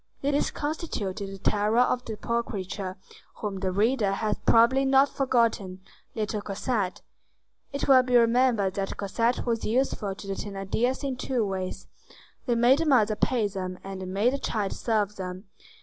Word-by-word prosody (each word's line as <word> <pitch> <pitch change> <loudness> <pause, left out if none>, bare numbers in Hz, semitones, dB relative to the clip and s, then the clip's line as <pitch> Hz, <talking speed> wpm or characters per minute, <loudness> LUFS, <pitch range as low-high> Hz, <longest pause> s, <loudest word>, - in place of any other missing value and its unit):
This 285 +1 +1
constituted 220 - -4
the 195 - -8
terror 210 +3 +1
of 250 0 +1
the 220 -2 -5
poor 235 +2 0
creature 190 -3 -5 0.4
whom 200 -3 -4
the 190 -1 -1
reader 210 +1 +2
has 210 +1 -1
probably 235 +4 +5
not 270 +1 +4
forgotten,—little 215 -3 -2
Cosette. 200 -1 -2 0.7
It 280 -1 -3
will 265 -2 +7
be 250 -1 0
remembered 230 -4 +3
that 195 0 -3
Cosette 230 +5 0
was 230 -2 -1
useful 220 -4 0
to 200 - -10
the 195 - -3
Thénardiers 205 +7 -2
in 270 -2 -2
two 250 -3 -1
ways: 190 -1 -4 0.6
they 240 - +2
made 245 +4 +5
the 330 - 0
mother 220 -7 +4
pay 230 -1 +1
them, 185 -2 -5
and 195 -1 -7
they - - -5
made 200 +7 +1
the 275 - -2
child 205 -6 -2
serve 210 -3 -1
them. 185 0 -6
215 Hz, 165 wpm, -27 LUFS, 195-250 Hz, 0.7 s, will